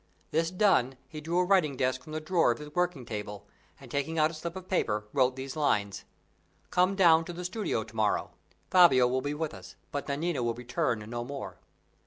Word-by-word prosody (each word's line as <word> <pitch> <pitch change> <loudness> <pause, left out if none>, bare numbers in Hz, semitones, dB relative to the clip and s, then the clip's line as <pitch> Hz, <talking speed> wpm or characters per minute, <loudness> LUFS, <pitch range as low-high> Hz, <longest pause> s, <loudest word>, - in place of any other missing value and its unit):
This 165 +1 +1
done, 180 - +2
he 155 -2 -8
drew 165 +3 -2
a 180 - +4
writing 175 -8 +2
desk 130 0 0
from 155 - -12
the 155 - -2
drawer 165 -2 +2
of 120 - +1
his 150 0 -10
working 180 -7 -1
table, 105 -2 -6 0.3
and 135 -3 -13
taking 145 +3 -2
out 155 0 +3
a - - -11
slip 165 +2 -6
of 185 -1 -8
paper 105 - 0
wrote 130 -2 +3
these 135 0 -6
lines: 100 -10 0 0.7
"Come 185 +2 +3
down 165 -4 +6
to 175 - -6
the 180 +1 -6
studio 185 - -2
to 110 +1 -15
morrow. 110 -2 0 0.4
Fabio 155 -9 +7
will 130 +1 0
be 145 +2 -3
with 155 0 -3
us, - - -11 0.2
but 145 - -4
Nanina 150 +1 -1
will 120 -1 -1
return 125 -3 -2
no 120 +1 -4
more." 140 +2 -7
145 Hz, 210 wpm, -29 LUFS, 125-170 Hz, 0.7 s, Fabio